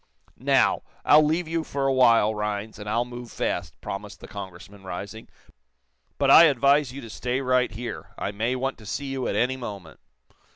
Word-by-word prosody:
"Now, -, -, +3 dB, 0.2 s
I'll 150 Hz, -, +7 dB
leave 160 Hz, +3 st, 0 dB
you 165 Hz, 0 st, -1 dB
for 140 Hz, -2 st, -3 dB
a 135 Hz, -, +2 dB
while, 115 Hz, -4 st, +4 dB
Rhinds, 105 Hz, 0 st, -4 dB
and 105 Hz, 0 st, -6 dB
I'll 115 Hz, +3 st, +1 dB
move 120 Hz, -1 st, -9 dB
fast," -, -, -3 dB
promised -, -, -7 dB
the -, -, -11 dB
Congressman, 100 Hz, 0 st, -10 dB
rising. 100 Hz, +4 st, -7 dB, 0.9 s
"But -, -, +3 dB
I 170 Hz, -, +10 dB
advise 140 Hz, -1 st, +3 dB
you 140 Hz, +2 st, -8 dB
to 115 Hz, -, -10 dB
stay 125 Hz, +3 st, -2 dB
right 125 Hz, -1 st, +2 dB
here. 110 Hz, -8 st, -7 dB
I 100 Hz, -, -3 dB
may 115 Hz, +5 st, -1 dB
want 135 Hz, 0 st, -3 dB
to 110 Hz, -, -14 dB
see 140 Hz, +8 st, -3 dB
you 130 Hz, -2 st, -2 dB
at -, -, -2 dB
any 130 Hz, +2 st, +1 dB
moment." 100 Hz, -, -8 dB
120 Hz, 190 wpm, -25 LUFS, 105-135 Hz, 0.9 s, I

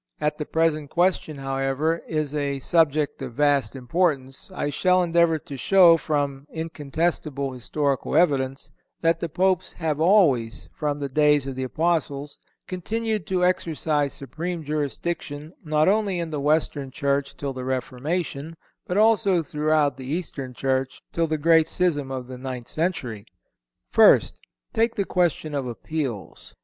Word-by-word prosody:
As 150 Hz, 0 st, +1 dB
the 150 Hz, -, -4 dB
present 155 Hz, -3 st, +1 dB
question, 175 Hz, -3 st, +1 dB
however, 135 Hz, +4 st, -1 dB
is 155 Hz, -2 st, -2 dB
a 140 Hz, -2 st, -1 dB
subject 150 Hz, 0 st, +1 dB
of 125 Hz, -3 st, -6 dB
vast 140 Hz, -4 st, +2 dB
importance, 135 Hz, 0 st, -1 dB
I 145 Hz, -5 st, -2 dB
shall 185 Hz, +4 st, +3 dB
endeavor 170 Hz, -1 st, +3 dB
to 145 Hz, -2 st, -9 dB
show, 180 Hz, +3 st, +6 dB
from 145 Hz, -3 st, -2 dB
incontestable 155 Hz, -3 st, -2 dB
historical 135 Hz, +3 st, -2 dB
evidence, 135 Hz, -5 st, +1 dB, 0.3 s
that 165 Hz, 0 st, +2 dB
the 170 Hz, -, -3 dB
Popes 185 Hz, +2 st, +1 dB
have 155 Hz, -3 st, -2 dB
always, 155 Hz, -, +3 dB
from 150 Hz, -2 st, -2 dB
the 145 Hz, -1 st, -3 dB
days 150 Hz, 0 st, +3 dB
of 135 Hz, -1 st, -5 dB
the 130 Hz, -, -4 dB
Apostles, 145 Hz, 0 st, -1 dB, 0.3 s
continued 215 Hz, +1 st, -3 dB
to 180 Hz, -1 st, +1 dB
exercise 155 Hz, -5 st, 0 dB
supreme 165 Hz, +5 st, -5 dB
jurisdiction 150 Hz, +1 st, -4 dB
not 155 Hz, -1 st, +2 dB
only 200 Hz, -2 st, +2 dB
in 170 Hz, -2 st, -3 dB
the 150 Hz, -2 st, -3 dB
Western 145 Hz, -2 st, 0 dB
Church 140 Hz, +1 st, -1 dB
till 140 Hz, -1 st, -3 dB
the 130 Hz, -1 st, -6 dB
Reformation, 140 Hz, +5 st, -3 dB, 0.3 s
but 180 Hz, -, -1 dB
also 210 Hz, -5 st, +4 dB
throughout 150 Hz, -2 st, +1 dB
the 130 Hz, -1 st, -8 dB
Eastern 140 Hz, -5 st, -4 dB
Church 130 Hz, 0 st, -1 dB
till 165 Hz, -1 st, 0 dB
the 155 Hz, 0 st, -1 dB
great 160 Hz, +1 st, +4 dB
schism 150 Hz, -7 st, 0 dB
of 130 Hz, -1 st, -4 dB
the 125 Hz, 0 st, -9 dB
ninth 125 Hz, -2 st, -6 dB
century. 145 Hz, -, -2 dB, 0.7 s
First—Take 220 Hz, -, +3 dB
the 200 Hz, -, 0 dB
question 175 Hz, -4 st, 0 dB
of 140 Hz, -3 st, -2 dB
appeals. 125 Hz, -, -5 dB
150 Hz, 145 wpm, -24 LUFS, 135-170 Hz, 0.7 s, show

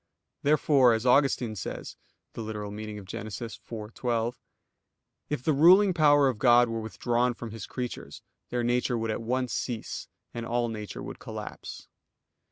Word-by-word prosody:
Therefore, 140 Hz, -4 st, +4 dB
as 110 Hz, +2 st, -1 dB
Augustine 125 Hz, -3 st, +3 dB
says 95 Hz, -, -6 dB, 0.4 s
(Gen. 110 Hz, -1 st, -5 dB
ad 110 Hz, -, -4 dB
lit. 105 Hz, 0 st, -6 dB, 0.3 s
iv, 110 Hz, -1 st, -7 dB
12): 120 Hz, -1 st, -1 dB, 0.9 s
"If 150 Hz, -4 st, -2 dB
the 155 Hz, -, +2 dB
ruling 185 Hz, +7 st, +6 dB
power 145 Hz, -4 st, +5 dB
of 125 Hz, -5 st, -1 dB
God 120 Hz, -1 st, +6 dB
were 115 Hz, 0 st, -3 dB
withdrawn 120 Hz, +2 st, 0 dB
from 115 Hz, -1 st, -7 dB
His 110 Hz, -2 st, -7 dB
creatures, 125 Hz, -2 st, -6 dB, 0.3 s
their 120 Hz, -1 st, -1 dB
nature 120 Hz, 0 st, +1 dB
would 115 Hz, -1 st, -1 dB
at 110 Hz, -, -3 dB
once 125 Hz, +2 st, -1 dB
cease, 120 Hz, -4 st, -4 dB, 0.3 s
and 120 Hz, -, -4 dB
all 120 Hz, +1 st, 0 dB
nature 105 Hz, -2 st, -6 dB
would -, -, -8 dB
collapse." -, -, -8 dB
120 Hz, 150 wpm, -28 LUFS, 110-130 Hz, 0.9 s, ruling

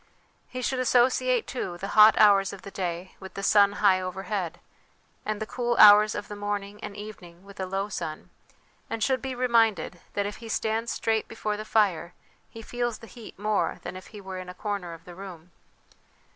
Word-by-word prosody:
He 255 Hz, 0 st, -6 dB
should 260 Hz, +1 st, -1 dB
associate, 255 Hz, 0 st, +3 dB
too, 185 Hz, -9 st, -4 dB
the 195 Hz, +3 st, -5 dB
hot 215 Hz, +1 st, +7 dB
hours 200 Hz, -2 st, +5 dB
of 200 Hz, -, -10 dB
the 200 Hz, -, -9 dB
day 180 Hz, -1 st, -4 dB
with 190 Hz, -1 st, -11 dB
the 195 Hz, -, -5 dB
sun 200 Hz, 0 st, +5 dB
high 200 Hz, -2 st, +3 dB
overhead, 185 Hz, -1 st, -4 dB, 0.7 s
and 215 Hz, -1 st, -2 dB
the 215 Hz, -, -3 dB
cool 240 Hz, +1 st, -2 dB
hours 210 Hz, 0 st, +8 dB
of 205 Hz, -, -5 dB
the 205 Hz, -, -7 dB
morning 205 Hz, 0 st, -4 dB
and 200 Hz, -, -6 dB
evening 190 Hz, -4 st, -10 dB
with 200 Hz, 0 st, -14 dB
alow 195 Hz, +1 st, -2 dB
sun; 165 Hz, -6 st, -6 dB, 0.6 s
and 225 Hz, -, -2 dB
should 260 Hz, +1 st, +1 dB
be 265 Hz, -1 st, -4 dB
reminded, 225 Hz, -9 st, +2 dB, 0.2 s
that 200 Hz, -, 0 dB
if 205 Hz, -, -5 dB
he 230 Hz, -1 st, -10 dB
stands 225 Hz, +1 st, -1 dB
straight 225 Hz, -1 st, 0 dB
before 215 Hz, -2 st, -3 dB
the 215 Hz, +1 st, -6 dB
fire, 185 Hz, -6 st, +1 dB, 0.3 s
he 225 Hz, -, -10 dB
feels 240 Hz, 0 st, -2 dB
the -, -, -12 dB
heat 230 Hz, -1 st, -12 dB
more 210 Hz, +1 st, 0 dB
than -, -, -6 dB
if 185 Hz, -, -10 dB
he 210 Hz, -, -11 dB
were 190 Hz, -1 st, -7 dB
in 185 Hz, 0 st, -8 dB
a 180 Hz, -, -9 dB
corner 200 Hz, -4 st, -4 dB
of 165 Hz, +1 st, -13 dB
the 180 Hz, -, -10 dB
room. 180 Hz, -2 st, -10 dB
205 Hz, 200 wpm, -27 LUFS, 190-225 Hz, 0.7 s, hours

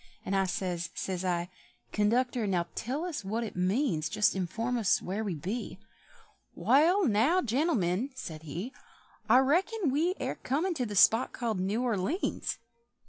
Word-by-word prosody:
And 195 Hz, -, -1 dB
I 195 Hz, -1 st, +2 dB
says, 175 Hz, -2 st, -2 dB
says 185 Hz, -1 st, -3 dB
I, 175 Hz, -1 st, -1 dB, 0.4 s
"Conductor, 235 Hz, +2 st, +1 dB
now 180 Hz, -3 st, +1 dB
tell 275 Hz, +8 st, -3 dB
us 315 Hz, -, -4 dB
what 220 Hz, +5 st, -2 dB
it 220 Hz, -, -6 dB
means, 180 Hz, -, 0 dB
Just 210 Hz, +4 st, +2 dB
inform 225 Hz, +7 st, -2 dB
us 210 Hz, -5 st, +3 dB
where 200 Hz, +4 st, -3 dB
we 195 Hz, -5 st, -2 dB
be?" 195 Hz, +9 st, -4 dB, 0.8 s
"Wall, 345 Hz, +8 st, +4 dB
now, 260 Hz, -, +3 dB
gentlemen," 240 Hz, -, +1 dB
said 160 Hz, -12 st, -7 dB
he, 170 Hz, -, -6 dB, 0.6 s
"I -, -, +7 dB
reckon 340 Hz, -, +2 dB
we 330 Hz, +7 st, +1 dB
air -, -, -2 dB
comin' 320 Hz, +8 st, 0 dB
to 255 Hz, -7 st, -2 dB
the 205 Hz, -, -5 dB
spot 225 Hz, +6 st, +5 dB
called 225 Hz, -6 st, -2 dB
New 205 Hz, +6 st, 0 dB
Or 235 Hz, -5 st, +1 dB
leéns!" 295 Hz, -, -2 dB
225 Hz, 160 wpm, -30 LUFS, 185-270 Hz, 0.8 s, I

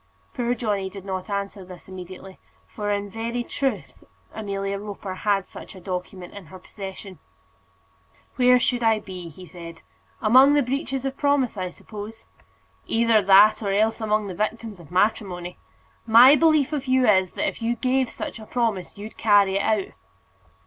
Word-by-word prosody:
Poor 245 Hz, -1 st, -1 dB
Johnny 205 Hz, -5 st, -2 dB
did 195 Hz, 0 st, -11 dB
not 190 Hz, +1 st, -5 dB
answer 200 Hz, 0 st, -4 dB
this 180 Hz, -1 st, -13 dB
immediately, 185 Hz, 0 st, -10 dB, 0.3 s
for 210 Hz, -1 st, -5 dB
in 205 Hz, 0 st, -1 dB
very 230 Hz, +3 st, -4 dB
truth 270 Hz, +2 st, -4 dB, 0.3 s
Amelia 200 Hz, -2 st, -4 dB
Roper 200 Hz, -2 st, -7 dB
had 195 Hz, 0 st, 0 dB
such -, -, -11 dB
a -, -, -10 dB
document 180 Hz, 0 st, -6 dB
in 200 Hz, -5 st, -11 dB
her 185 Hz, -, -11 dB
possession. 190 Hz, 0 st, -9 dB, 1.2 s
"Where 250 Hz, 0 st, +5 dB
should 245 Hz, 0 st, 0 dB
I 225 Hz, -1 st, +3 dB
be?" 180 Hz, -3 st, -10 dB
said 170 Hz, 0 st, -10 dB
he. -, -, -22 dB, 0.4 s
"Among 260 Hz, +6 st, +6 dB
the 290 Hz, -, +3 dB
breaches 270 Hz, +1 st, -3 dB
of 270 Hz, 0 st, -3 dB
promise, 285 Hz, -5 st, +1 dB
I 185 Hz, -2 st, -3 dB
suppose." 215 Hz, +4 st, -10 dB, 0.6 s
"Either 225 Hz, -1 st, +3 dB
that, 200 Hz, +3 st, +6 dB
or 200 Hz, -2 st, -1 dB
else 220 Hz, +3 st, +1 dB
among 215 Hz, -1 st, 0 dB
the 195 Hz, -, -5 dB
victims 215 Hz, +1 st, -4 dB
of 165 Hz, -, -14 dB
matrimony. 180 Hz, -2 st, -1 dB, 0.5 s
My 240 Hz, +5 st, +8 dB
belief 310 Hz, -1 st, +3 dB
of 275 Hz, -3 st, -3 dB
you 255 Hz, 0 st, +3 dB
is, 190 Hz, -3 st, +3 dB
that -, -, -1 dB
if -, -, -5 dB
you 230 Hz, +1 st, 0 dB
gave 255 Hz, +1 st, 0 dB
such -, -, -7 dB
a 215 Hz, -, -11 dB
promise, 220 Hz, -8 st, -2 dB
you'd 210 Hz, +2 st, -9 dB
carry 200 Hz, -3 st, +4 dB
it -, -, 0 dB
out." 210 Hz, -2 st, 0 dB
210 Hz, 170 wpm, -24 LUFS, 190-235 Hz, 1.2 s, My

